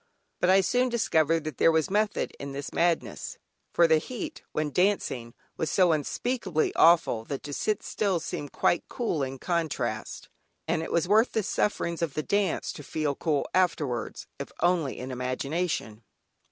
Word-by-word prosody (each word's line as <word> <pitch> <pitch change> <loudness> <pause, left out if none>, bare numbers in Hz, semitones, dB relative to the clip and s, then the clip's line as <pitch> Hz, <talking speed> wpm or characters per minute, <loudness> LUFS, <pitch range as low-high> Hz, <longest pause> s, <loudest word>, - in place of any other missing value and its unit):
But 180 - +2
I 190 +1 +6
soon 250 +6 +2
discovered 165 -9 +2
that 155 -4 -6
there 165 - +6
was 160 +2 +1
method 210 0 +1
in 140 0 -6
this 140 0 -6
madness, 170 -1 0 0.3
for 170 - +5
the 160 -1 +5
heat, 255 - -6
when 155 -1 -1
dancing, 135 - 0 0.2
was 160 - -1
so 180 0 +4
unspeakably 180 - -1
awful 165 -9 +5
that 140 +2 -5
to 145 - -6
sit 210 +7 -1
still 195 -5 0
seemed 145 -3 -5
quite 175 - +2
cool 225 - -1
in 135 0 -3
contrast, 170 +1 -2 0.4
and 160 0 +1
it 165 - -5
was 170 0 +1
worth 220 +5 +4
the 220 - +1
sufferings 170 -4 -1
of 165 -4 -1
the 155 - -1
dance 200 -1 0
to - - -9
feel 150 0 -1
cool 150 0 -1
afterwards, 155 -10 0
if - - -6
only 175 -6 +1
in 130 +1 -6
imagination. 130 -1 -2
165 Hz, 165 wpm, -27 LUFS, 145-190 Hz, 0.4 s, I